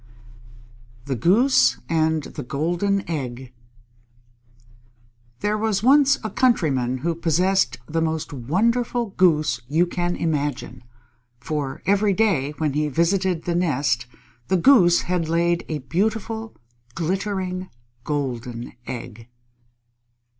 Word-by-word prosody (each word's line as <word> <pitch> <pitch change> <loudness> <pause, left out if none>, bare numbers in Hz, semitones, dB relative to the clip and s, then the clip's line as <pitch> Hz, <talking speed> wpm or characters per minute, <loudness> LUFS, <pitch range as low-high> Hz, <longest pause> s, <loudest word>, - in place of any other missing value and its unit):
_ - - -25
THE 140 -2 -2
GOOSE 170 - +4
AND 160 -1 +1
THE - - -7
GOLDEN 175 +9 -1
EGG 130 -5 -5 1.9
There 210 +1 0
was 215 -2 0
once 280 +2 +5
a 215 - -4
Countryman 140 - +1
who 170 - +1
possessed 175 +4 +1
the 165 +1 -1
most 160 -2 -2
wonderful 225 - 0
Goose 155 -9 +2
you 160 +6 +2
can 175 0 -2
imagine, 145 -5 -3 0.6
for 140 0 -4
every 200 +1 +3
day 165 -10 +1
when 155 -3 -1
he 150 +1 0
visited 170 +3 0
the 175 - -1
nest, 140 -8 0 0.4
the 190 - +2
Goose 175 -5 +5
had 175 -3 -2
laid 170 +1 +1
a 155 - -1
beautiful, 220 - -2 0.4
glittering, 185 +1 -2 0.3
golden 125 -5 -4
egg. 115 -2 -7
170 Hz, 110 wpm, -23 LUFS, 140-195 Hz, 1.9 s, once